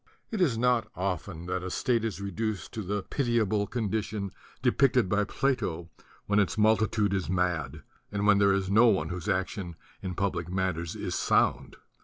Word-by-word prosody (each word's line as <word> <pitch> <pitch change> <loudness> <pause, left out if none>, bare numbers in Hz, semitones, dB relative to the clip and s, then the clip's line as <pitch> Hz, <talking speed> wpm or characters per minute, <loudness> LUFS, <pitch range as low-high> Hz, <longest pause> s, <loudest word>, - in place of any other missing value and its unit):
It 215 -4 -2
is 135 -10 +3
not 120 -2 +2
often 90 -2 -3
that 90 +1 -2
a 95 - -4
state 115 +4 0
is 110 -4 -3
reduced 100 0 -3
to 110 - -3
the 100 0 -2
pitiable 110 -5 0
condition 105 -3 -2 0.3
depicted - - +3
by 105 +2 +1
Plato 90 - -1 0.3
when 105 0 +2
its 100 - +1
multitude 110 -1 +3
is 95 -3 -1
mad 85 -6 -1 0.3
and 105 0 -1
when 105 -1 +5
there 100 -1 +5
is 95 -1 0
no 115 +4 +6
one 100 -5 +2
whose 90 +2 -4
action 95 -2 -2 0.3
in 90 -2 -4
public 90 -3 -1
matters 90 -3 -2
is - - -4
sound. - - +1
100 Hz, 170 wpm, -28 LUFS, 90-110 Hz, 0.3 s, no